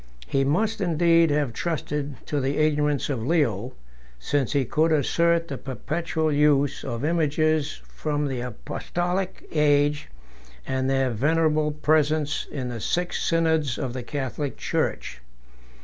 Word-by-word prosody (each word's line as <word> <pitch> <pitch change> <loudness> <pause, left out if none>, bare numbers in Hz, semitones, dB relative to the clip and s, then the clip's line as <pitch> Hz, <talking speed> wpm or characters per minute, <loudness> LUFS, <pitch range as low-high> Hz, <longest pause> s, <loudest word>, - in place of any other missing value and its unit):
He 135 - +1
must 210 +10 0
indeed 170 -1 +4
have 145 -4 0
trusted 150 -2 -3
to 145 -2 -1
the 135 +2 -1
ignorance 150 -2 +1
of 135 -6 -2
Leo, 125 - 0 0.4
since 135 - -1
he 140 -2 +2
could 160 +6 +1
assert 170 +3 +2
the 140 -4 -5
perpetual 155 +3 -2
use 145 -1 +2
of 120 +1 -3
images, 155 -2 +1
from 150 -1 -2
the 130 -2 -3
apostolic 175 - -3
age, 145 -1 +2 0.6
and 130 0 -1
their 135 -1 +1
venerable 155 +5 +2
presence 150 0 +1
in 130 -3 -4
the 120 -2 -5
six 175 +8 -1
synods 160 -5 +1
of 125 -2 -3
the 130 - -4
Catholic 140 +2 -4
church. - - -2
150 Hz, 135 wpm, -25 LUFS, 135-160 Hz, 0.6 s, indeed